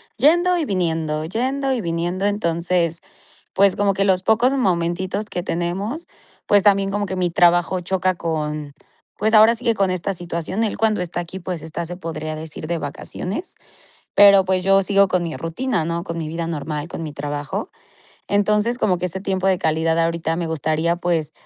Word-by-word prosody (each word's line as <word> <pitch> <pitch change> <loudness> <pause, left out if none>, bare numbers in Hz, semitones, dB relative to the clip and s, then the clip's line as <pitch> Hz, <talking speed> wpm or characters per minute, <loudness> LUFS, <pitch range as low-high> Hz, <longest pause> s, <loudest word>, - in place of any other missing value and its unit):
yendo 345 +7 +4
y 330 - 0
viniendo 160 - -1
yendo 265 +8 -1
y 240 - -1
viniendo, 175 +3 -2
entonces, 170 -4 0 0.5
pues 195 -1 +4
como 200 -1 +2
que 195 0 +1
los 190 -1 +2
pocos 230 +5 +3
momentitos 185 -3 0
que 180 -4 -4
tenemos, 195 - -3 0.4
pues 205 -1 +4
también 195 -1 +3
como 205 0 -1
que 190 - -4
mi 180 -1 0
trabajo 175 +1 +3
choca 185 +1 0
con 150 -3 -3 0.4
pues 220 +2 0
ahora 220 +2 +7
sí 240 - -8
que 230 -2 +2
con 195 -2 +1
esta 185 +2 -2
situación, 175 +4 -3
él 210 - -3
cuando 220 -2 +1
está 175 0 -3
aquí, 180 +3 -7
pues 175 -3 -5
está, 160 +2 -5
se 175 +1 -6
podría 155 -3 -5
decir, 155 0 -8
de 170 0 -1
vacaciones, 180 - -5 0.6
pero, 200 -2 +7
pues 185 -1 0
yo 195 0 +5
sigo 200 0 +4
con 180 -1 0
mi 165 -5 -4
rutina, 165 - -2
¿no? 170 +1 -2
con 170 -2 -5
mi 160 - -3
vida 165 +1 -4
normal, 150 0 -4
con 165 - -6
mi 150 - -6
trabajo, 145 0 -4 0.6
entonces, 210 +4 +2
como 180 -3 +1
que 180 - -1
ese 185 +2 -4
tiempo 190 -1 0
de 185 -2 +2
calidad 160 +1 +1
ahorita 165 -1 0
me 170 -1 -2
gustaría, 160 +2 0
pues, 170 -3 -1
180 Hz, 185 wpm, -21 LUFS, 165-200 Hz, 0.6 s, ahora